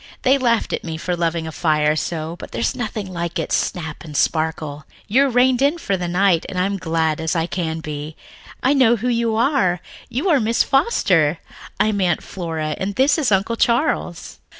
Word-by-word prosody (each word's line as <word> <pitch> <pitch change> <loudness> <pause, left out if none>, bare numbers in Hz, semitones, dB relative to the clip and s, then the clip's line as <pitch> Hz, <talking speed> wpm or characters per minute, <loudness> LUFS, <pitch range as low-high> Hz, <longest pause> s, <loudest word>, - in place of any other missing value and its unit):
They 270 +1 +4
laughed 235 -3 +1
at - - -2
me 160 -2 -5
for 180 +3 -2
loving 165 -1 -1
a 160 - -5
fire 155 -2 +1
so, 160 +1 -3
but - - -8
there's 115 0 -1
nothing 215 -5 -4
like 170 -1 -3
its - - 0
snap 160 -5 -3
and 150 -3 -6
sparkle. 155 -2 -1 0.2
You're 270 +6 +3
rained 250 +1 +3
in 285 +5 +3
for 200 -12 -1
the 180 -1 -3
night, 175 -1 +2
and 185 - -6
I'm 190 +2 +1
as 195 - -4
glad 160 -2 0
as 160 +1 -1
I 165 -1 +1
can 165 -2 -3
be. 150 0 -6 0.5
I 265 - +4
know 255 -4 +5
who 240 +3 -2
you 230 -2 +1
are 220 - +2 0.3
you 270 +10 -2
are 300 -5 +4
Miss 230 0 +2
Foster. 185 - +2 0.4
I'm 210 -1 +2
Aunt 175 -3 +1
Flora, 160 -4 -4
and 195 +1 -3
this 280 +4 +3
is 275 -7 +1
Uncle 200 +4 +1
Charles." 235 - 0
180 Hz, 195 wpm, -20 LUFS, 160-235 Hz, 0.5 s, know